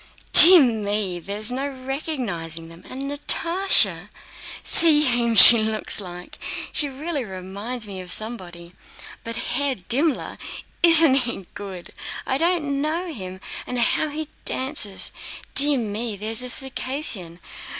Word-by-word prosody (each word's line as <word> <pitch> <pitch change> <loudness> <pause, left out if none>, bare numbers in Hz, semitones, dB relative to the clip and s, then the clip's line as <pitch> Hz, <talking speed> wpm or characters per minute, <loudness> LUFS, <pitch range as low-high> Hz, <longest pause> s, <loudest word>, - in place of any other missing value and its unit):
"Dear 350 -2 +9
me! 205 -6 -3
there's 205 +6 -1
no 270 +3 -4
recognizing 255 - -7
them! 165 +1 -16
And 265 +1 -8
Natásha! 335 +6 0 0.5
See 305 -3 +5
whom 240 -3 -1
she 230 +3 +11
looks 215 -1 0
like! 180 -1 -12 0.3
She 290 - 0
really 285 +1 -6
reminds 200 +4 -8
me 195 -2 -9
of 180 -1 -10
somebody. 180 -6 -3 0.5
But 230 0 -6
Herr 275 +2 -3
Dimmler—isn't 310 - +1
he 240 -7 -3
good! 190 -3 -11 0.3
I 265 0 -3
didn't 310 -5 -2
know 330 +3 -5
him! 185 -4 -11 0.3
And 250 - -5
how 245 +6 -1
he 305 +1 -7 0.2
dances. 260 -7 -4 0.4
Dear 285 0 +4
me, 220 -1 -5
there's 220 +3 -3
a 250 - -4
Circassian. 255 - -4
240 Hz, 125 wpm, -20 LUFS, 200-285 Hz, 0.5 s, she